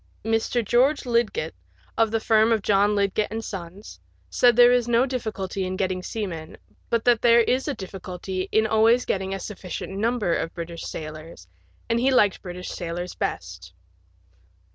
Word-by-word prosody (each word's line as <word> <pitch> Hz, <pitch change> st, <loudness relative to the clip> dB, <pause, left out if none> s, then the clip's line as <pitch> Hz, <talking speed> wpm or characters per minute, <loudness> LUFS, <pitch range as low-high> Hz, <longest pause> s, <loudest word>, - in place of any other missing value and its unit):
Mr. 225 Hz, +1 st, 0 dB
George 260 Hz, +7 st, +2 dB
Lidgett, 240 Hz, -, 0 dB, 0.4 s
of 225 Hz, -1 st, +3 dB
the 225 Hz, +1 st, 0 dB
firm 220 Hz, 0 st, +3 dB
of 220 Hz, -3 st, +1 dB
John 205 Hz, +1 st, +3 dB
Lidgett 200 Hz, +1 st, +1 dB
and 225 Hz, +1 st, -5 dB
Sons, 190 Hz, +1 st, -8 dB, 0.3 s
said 245 Hz, -2 st, +4 dB
there 245 Hz, +1 st, +7 dB
is 245 Hz, -1 st, +2 dB
no 240 Hz, +1 st, +3 dB
difficulty 215 Hz, -7 st, -3 dB
in 185 Hz, 0 st, -3 dB
getting 185 Hz, -1 st, -1 dB
seamen, 180 Hz, -6 st, -5 dB, 0.3 s
but 230 Hz, -1 st, 0 dB
that 240 Hz, -3 st, +4 dB
there 235 Hz, 0 st, +6 dB
is 255 Hz, +4 st, 0 dB
a 290 Hz, -, -1 dB
difficulty 185 Hz, -1 st, -6 dB
in 220 Hz, 0 st, +3 dB
always 225 Hz, +3 st, +3 dB
getting 190 Hz, 0 st, -2 dB
a 195 Hz, -, -3 dB
sufficient 190 Hz, -1 st, -6 dB
number 220 Hz, -3 st, 0 dB
of 165 Hz, -, -3 dB
British 170 Hz, -1 st, -6 dB
sailors, 155 Hz, -, -8 dB, 0.4 s
and 230 Hz, 0 st, +1 dB
he 260 Hz, +3 st, +3 dB
liked 210 Hz, -7 st, +3 dB
British 180 Hz, 0 st, -7 dB
sailors 175 Hz, +1 st, -5 dB
best. 85 Hz, -1 st, -5 dB
210 Hz, 165 wpm, -24 LUFS, 185-235 Hz, 0.4 s, there